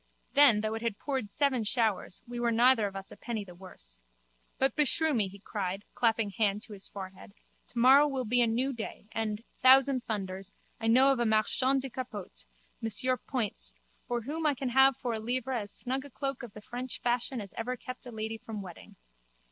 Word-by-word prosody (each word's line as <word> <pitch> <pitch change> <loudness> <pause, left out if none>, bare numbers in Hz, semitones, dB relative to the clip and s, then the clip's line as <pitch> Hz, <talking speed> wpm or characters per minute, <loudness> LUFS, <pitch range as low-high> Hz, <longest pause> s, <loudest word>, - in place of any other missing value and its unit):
Then, 275 -7 +7
though 215 0 -1
it 225 - -4
had 230 -3 -2
poured 265 -7 -3
seven 265 -1 +1
showers, 215 -4 0
we 240 0 -5
were 240 -1 +1
neither 235 -1 +5
of 195 - -9
us 195 0 -6
a - - -9
penny 230 -3 -4
the 180 - -12
worse. 175 - -9 0.6
But 270 0 +1
beshrew 305 +2 +3
me, 215 -6 +2
he 195 +1 -11
cried, 195 -1 -4
clapping 225 -3 +1
hand 210 0 0
to 220 - -8
his 195 -1 -2
forehead, 190 - -9 0.3
tomorrow 265 +5 +6
will 265 -3 -2
be 245 +3 +3
a 235 - +4
new 250 +5 0
day 225 -3 -7
and, 220 -1 -2 0.2
thousand 265 0 +6
thunders, 195 -4 -5 0.2
I 225 - -2
know 260 +4 +6
of 265 - 0
a 240 - +2
marchand 255 +5 +2
de 270 - -4
capotes, 215 - -7 0.3
Monsieur 225 +4 +2
Poyntz, 245 -5 -2 0.3
from 240 -2 -2
whom 310 +5 -2
I 290 - +2
can 265 0 -3
have 265 +1 +5
for 240 - -3
a 220 - -2
livre 250 +3 -2
as 210 -4 -3
snug 265 +2 -3
a 285 - -11
cloak 275 0 -4
of 235 -5 -9
the 210 - -10
French 245 +3 -6
fashion 245 +1 -1
as 200 -4 -8
ever 250 +2 -3
kept 255 +1 -8
a - - -7
lady 220 0 -4
from 215 -3 -7
wetting. 180 -3 -12
235 Hz, 205 wpm, -30 LUFS, 210-260 Hz, 0.6 s, Then